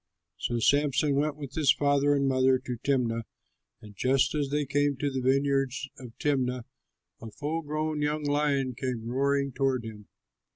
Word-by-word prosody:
So 120 Hz, -, -1 dB
Samson 145 Hz, +3 st, +2 dB
went 145 Hz, +1 st, 0 dB
with 140 Hz, -3 st, -8 dB
his 150 Hz, -4 st, +4 dB
father 145 Hz, 0 st, +2 dB
and 140 Hz, -1 st, +1 dB
mother 130 Hz, 0 st, +3 dB
to 125 Hz, -2 st, -6 dB
Timnah; 120 Hz, -5 st, +1 dB, 0.6 s
and 105 Hz, -1 st, -12 dB
just 130 Hz, +6 st, +2 dB
as 145 Hz, -3 st, -1 dB
they 145 Hz, +1 st, 0 dB
came 145 Hz, 0 st, +1 dB
to 145 Hz, +1 st, -1 dB
the 130 Hz, -1 st, -2 dB
vineyards 135 Hz, +1 st, +1 dB
of 120 Hz, -3 st, -11 dB
Timnah, 125 Hz, -4 st, 0 dB, 0.6 s
a 115 Hz, -, -7 dB
full 150 Hz, +8 st, -3 dB
grown 155 Hz, 0 st, -2 dB
young 150 Hz, +1 st, -1 dB
lion 145 Hz, -3 st, +1 dB
came 125 Hz, -2 st, -4 dB
roaring 140 Hz, +2 st, +1 dB
toward 130 Hz, -2 st, 0 dB
him. 105 Hz, -2 st, -9 dB
140 Hz, 165 wpm, -28 LUFS, 130-145 Hz, 0.6 s, his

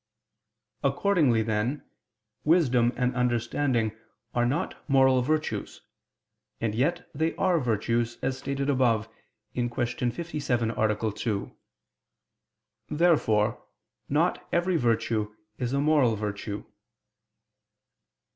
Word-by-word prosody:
Accordingly, 140 Hz, -, +3 dB
then, 110 Hz, +6 st, -1 dB, 0.6 s
wisdom 130 Hz, -8 st, +4 dB
and 125 Hz, 0 st, 0 dB
understanding 120 Hz, -1 st, 0 dB, 0.4 s
are 120 Hz, 0 st, +2 dB
not 150 Hz, +9 st, -2 dB
moral 130 Hz, -1 st, +5 dB
virtues: 150 Hz, -6 st, -2 dB, 0.8 s
and 110 Hz, -2 st, -1 dB
yet 165 Hz, +10 st, 0 dB
they 160 Hz, +3 st, 0 dB
are 180 Hz, -3 st, +2 dB
virtues, 115 Hz, -1 st, 0 dB
as 130 Hz, 0 st, 0 dB
stated 140 Hz, +1 st, -2 dB
above 120 Hz, -6 st, +2 dB, 0.5 s
(Q. 120 Hz, -1 st, -1 dB
57, 120 Hz, +1 st, -1 dB
A. 110 Hz, 0 st, 0 dB
2). 105 Hz, -2 st, -3 dB, 1.4 s
Therefore 120 Hz, -10 st, +2 dB, 0.5 s
not 160 Hz, +5 st, +1 dB
every 175 Hz, +1 st, +1 dB
virtue 115 Hz, -5 st, 0 dB, 0.2 s
is 125 Hz, -1 st, -1 dB
a 140 Hz, -, +1 dB
moral 145 Hz, -6 st, +3 dB
virtue. 105 Hz, 0 st, -4 dB
125 Hz, 95 wpm, -27 LUFS, 115-145 Hz, 1.4 s, moral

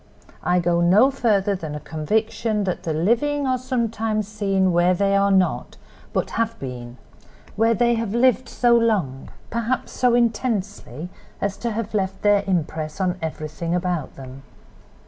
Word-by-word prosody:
I 180 Hz, -, +1 dB
go 170 Hz, 0 st, +1 dB
no 200 Hz, +10 st, +5 dB
further 210 Hz, -7 st, +1 dB
than 160 Hz, -6 st, -5 dB
a -, -, -4 dB
conviction 210 Hz, +8 st, -1 dB
that 185 Hz, -2 st, -2 dB
the 165 Hz, -, -3 dB
living 235 Hz, -, +1 dB
are 255 Hz, -1 st, +1 dB
sometimes 225 Hz, -4 st, -1 dB
seen 195 Hz, -3 st, +1 dB
where 175 Hz, +1 st, +3 dB
they 200 Hz, +2 st, +2 dB
are 200 Hz, 0 st, +3 dB
not, 190 Hz, -2 st, +1 dB, 0.3 s
but -, -, -1 dB
have 230 Hz, 0 st, -2 dB
been—where 125 Hz, -, -4 dB
they 240 Hz, +2 st, +3 dB
have 225 Hz, -2 st, -2 dB
lived 255 Hz, +1 st, +3 dB
so 240 Hz, -1 st, +3 dB
long, 200 Hz, -, 0 dB, 0.2 s
perhaps 235 Hz, +2 st, -2 dB
so 250 Hz, -2 st, +2 dB
intensely, 210 Hz, -, -1 dB, 0.3 s
as 200 Hz, -1 st, -1 dB
to 235 Hz, -, -3 dB
have 220 Hz, -1 st, -4 dB
left 195 Hz, -2 st, -2 dB
their 205 Hz, -1 st, +4 dB
impress 155 Hz, -3 st, -2 dB
on 185 Hz, -1 st, -1 dB
everything 160 Hz, +1 st, -3 dB
about 180 Hz, -4 st, -2 dB
them. 135 Hz, 0 st, -10 dB
200 Hz, 150 wpm, -22 LUFS, 170-230 Hz, 0.3 s, no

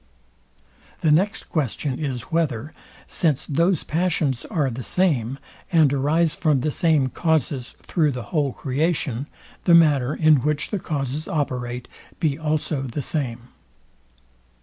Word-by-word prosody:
The 155 Hz, -, +3 dB
next 190 Hz, +7 st, +2 dB
question 140 Hz, -2 st, -2 dB
is, 125 Hz, -5 st, -4 dB
whether, 155 Hz, -4 st, -1 dB, 0.3 s
since 155 Hz, -6 st, 0 dB
those 165 Hz, +4 st, +1 dB
passions 155 Hz, -6 st, 0 dB
are 145 Hz, -6 st, 0 dB
the 120 Hz, +2 st, -5 dB
same, 135 Hz, -6 st, +1 dB, 0.3 s
and 155 Hz, -5 st, +4 dB
arise 150 Hz, +4 st, +2 dB
from 150 Hz, -6 st, +1 dB
the 155 Hz, -, 0 dB
same 155 Hz, -5 st, +2 dB
causes 145 Hz, -5 st, -1 dB
through 155 Hz, -5 st, +1 dB
the 125 Hz, -1 st, -5 dB
whole 145 Hz, -4 st, +2 dB
creation, 140 Hz, -1 st, -1 dB, 0.4 s
the 170 Hz, -, +7 dB
manner, 145 Hz, -5 st, +4 dB
in 155 Hz, -2 st, +5 dB
which 150 Hz, +3 st, -1 dB
the 205 Hz, -, -1 dB
causes 145 Hz, -1 st, -3 dB
operate, 125 Hz, -5 st, -2 dB, 0.3 s
be 155 Hz, -5 st, +1 dB
also 155 Hz, -1 st, -1 dB
the 135 Hz, +2 st, -4 dB
same. 120 Hz, -5 st, -3 dB
150 Hz, 130 wpm, -23 LUFS, 130-160 Hz, 0.4 s, the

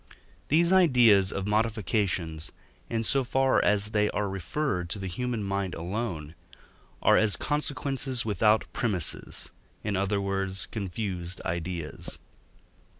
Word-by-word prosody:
These 170 Hz, +5 st, +3 dB
ideas 120 Hz, -, +5 dB
of 100 Hz, -, -3 dB
modifications, 100 Hz, -7 st, 0 dB, 0.4 s
in 115 Hz, -1 st, -1 dB
so 135 Hz, +4 st, +2 dB
far 135 Hz, +1 st, +2 dB
as 105 Hz, 0 st, +2 dB
they 105 Hz, -1 st, +2 dB
are 105 Hz, 0 st, -1 dB
referred 95 Hz, -, -2 dB
to 95 Hz, -, -3 dB
the 95 Hz, -, -6 dB
human 115 Hz, +4 st, -3 dB
mind 100 Hz, -1 st, -2 dB
alone, 85 Hz, -4 st, -4 dB, 0.7 s
are -, -, +6 dB
as 105 Hz, -3 st, +4 dB
consequences 135 Hz, -3 st, -1 dB
without 105 Hz, +1 st, +3 dB
premisses, 95 Hz, -9 st, +1 dB, 0.3 s
in 105 Hz, -1 st, -1 dB
other 100 Hz, +1 st, 0 dB
words, 95 Hz, -1 st, -1 dB
confused 95 Hz, -3 st, -4 dB
ideas. 85 Hz, -1 st, -4 dB
105 Hz, 120 wpm, -28 LUFS, 95-115 Hz, 0.7 s, are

